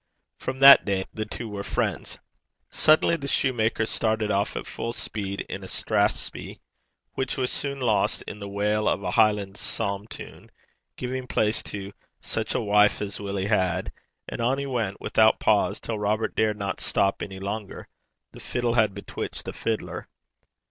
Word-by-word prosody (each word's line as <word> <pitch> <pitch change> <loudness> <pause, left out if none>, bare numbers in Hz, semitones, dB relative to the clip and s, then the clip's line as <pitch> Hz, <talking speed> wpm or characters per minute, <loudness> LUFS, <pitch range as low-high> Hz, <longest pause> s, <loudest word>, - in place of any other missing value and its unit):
From 130 - -4
that 140 +1 +10
day 95 -2 -1
the 110 -1 -4
two 115 - -6
were 100 -2 -5
friends. - - -2 0.5
Suddenly 155 +2 +4
the 140 -3 -6
soutar 115 -5 +1
started 110 -1 0
off 100 +1 0
at - - -4
full 115 - -4
speed 100 -3 -4
in - - -6
a - - -7
strathspey, - - -1 0.5
which 130 -1 -2
was 130 -1 0
soon 140 -1 -2
lost 115 -5 +1
in 105 - -8
the 100 -1 -6
wail 105 +2 +1
of 100 - -1
a - - -1
Highland 105 -2 +2
psalm 100 -1 -3
tune, - - -10 0.5
giving 130 0 -4
place 110 -2 +1
in - - -12
its - - -5
turn 100 -1 -5
to 100 +1 -9 0.3
'Sic - - -2
a - - +1
wife 105 0 +4
as 100 -1 -4
Willie 100 -1 -2
had!' 95 -5 +1 0.4
And - - -5
on 125 +3 +2
he 140 - -2
went 115 -7 -2
without 110 0 +4
pause, 105 -1 +2
till 110 -2 -4
Robert 105 +2 0
dared 110 -1 +2
not 100 -1 -3
stop 100 0 +1
any 95 -1 -5
longer. 100 +1 -5 0.4
The - - -12
fiddle 120 -1 -1
had 110 -5 +3
bewitched 100 - -5
the - - -5
fiddler. 110 -1 -3
105 Hz, 175 wpm, -26 LUFS, 100-115 Hz, 0.5 s, that